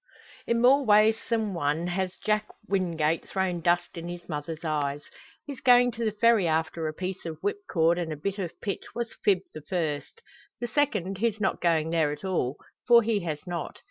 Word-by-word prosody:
In 235 0 +2
more 270 +3 +6
ways 215 -1 +5
than 220 -3 0
one 160 0 0
has 185 +1 -2
Jack 215 0 +1 0.2
Wingate 165 -5 0
thrown 185 -3 -1
dust 175 +2 +1
in 170 - -7
his 175 0 -7
mother's 155 +1 -5
eyes. 145 -2 -1 0.4
His 280 -3 -7
going 245 -1 +5
to 235 +1 -5
the 220 - +1
Ferry 215 -3 +3
after 160 0 0
a 155 - -3
piece 185 +1 -4
of 165 -2 -5
whipcord 180 - +1
and 165 -2 -3
a 155 - -4
bit 200 +7 -3
of 175 -4 -5
pitch 200 - -5
was 235 -1 -3
fib 195 -3 +3
the 155 - -8
first; 165 - -3 0.4
the 240 - -2
second 210 -7 0
his 220 -1 0
not 195 -2 0
going 160 -2 +2
there 160 -3 +2
at 150 +6 -7
all 150 -8 -1 0.3
for 235 -1 +7
he 220 -1 +1
has 150 -3 -4
not. 175 -3 -5
185 Hz, 195 wpm, -27 LUFS, 160-220 Hz, 0.4 s, for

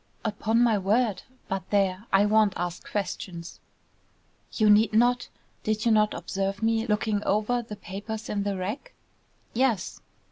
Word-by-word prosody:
"Upon 220 +2 +1
my 225 -4 +3
word! 210 +2 +1 0.3
But 190 -1 -4
there, 195 +1 +1
I 195 +1 +5
won't 210 -2 +3
ask 175 0 -4
questions." 180 -3 -5 0.9
"You 215 - +2
need 210 +1 +5
not. 245 +2 +3 0.3
Did 215 +1 -1
you 230 - +4
not 215 -1 +3
observe 195 +2 -3
me 225 +1 +1
looking 210 -1 0
over 215 +4 +1
the 220 -2 -8
papers 210 +3 -6
in 205 - -1
the 200 -1 -2
rack?" 210 - -5 0.6
"Yes." 235 -6 0
210 Hz, 145 wpm, -26 LUFS, 195-225 Hz, 0.9 s, I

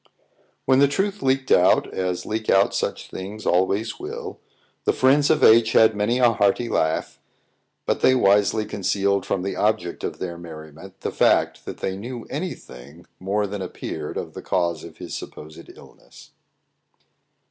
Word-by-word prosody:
When 130 0 +4
the 140 - +6
truth 195 +7 -2
leaked 135 0 0
out, 90 - +4
as 90 -1 -2
leak 110 0 -3
out 95 +1 +4
such - - -3
things 100 +3 -7
always 95 - 0
will, 430 +4 -7 0.5
the - - +3
friends 140 +3 +3
of 155 -1 +2
H 115 0 +6
had 110 -1 +5
many 105 +4 +1
a 125 -2 +5
hearty 110 +2 +1
laugh; 80 0 -1 0.7
but - - -1
they 130 - +5
wisely 105 -1 +3
concealed 100 0 -1
from 90 - -1
the 100 - -3
object 105 -5 -1
of - - -4
their 85 -2 -5
merriment 80 +2 -11
the - - -3
fact - - +2
that - - -8
they 95 - -2
knew 120 +3 -7
any 170 +5 -3
thing 70 +7 -14
more 100 +3 -1
than 100 0 -5
appeared 95 - -6
of - - -5
the - - -8
cause 85 -3 -1
of 85 - -11
his - - -8
supposed 75 0 -9
illness. - - -17
105 Hz, 165 wpm, -23 LUFS, 90-125 Hz, 0.7 s, the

